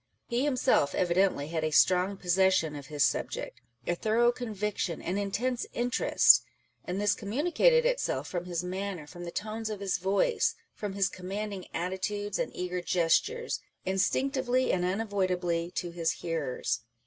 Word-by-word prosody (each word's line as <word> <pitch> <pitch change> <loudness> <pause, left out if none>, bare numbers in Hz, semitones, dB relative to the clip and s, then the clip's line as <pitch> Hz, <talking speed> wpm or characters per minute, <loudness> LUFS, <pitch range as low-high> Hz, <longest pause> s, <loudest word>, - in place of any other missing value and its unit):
He 240 +2 0
himself 255 - +2
evidently 175 -4 +2
had 160 -1 -2
a 155 - +1
strong 185 +5 +3
possession 185 -4 +2
of 140 -1 -8
his 150 -2 +1
subject, - - -2 0.2
a - - +1
thorough 225 +6 +3
conviction, 210 -7 -3
an 185 +3 -2
intense 235 +5 -1
interest; 245 +1 +5 0.4
and 180 +2 -3
this 205 0 +3
communicated 345 - +2
itself - - 0
from 175 -1 -4
his 175 -1 -3
manner, 185 -2 -4
from 175 +3 -9
the 170 - -5
tones 220 +3 -4
of 210 -2 -4
his 195 -2 -1
voice, 200 - +1 0.2
from 205 -2 -5
his 195 -1 +2
commanding 195 +1 -5
attitudes 190 +4 -2
and - - -1
eager 180 0 -3
gestures, 185 - +1 0.3
instinctively 255 +6 +1
and 180 -1 +1
unavoidably 185 -4 0
to 175 - -2
his 170 -1 -1
hearers. 160 -10 -2
190 Hz, 150 wpm, -29 LUFS, 175-220 Hz, 0.4 s, interest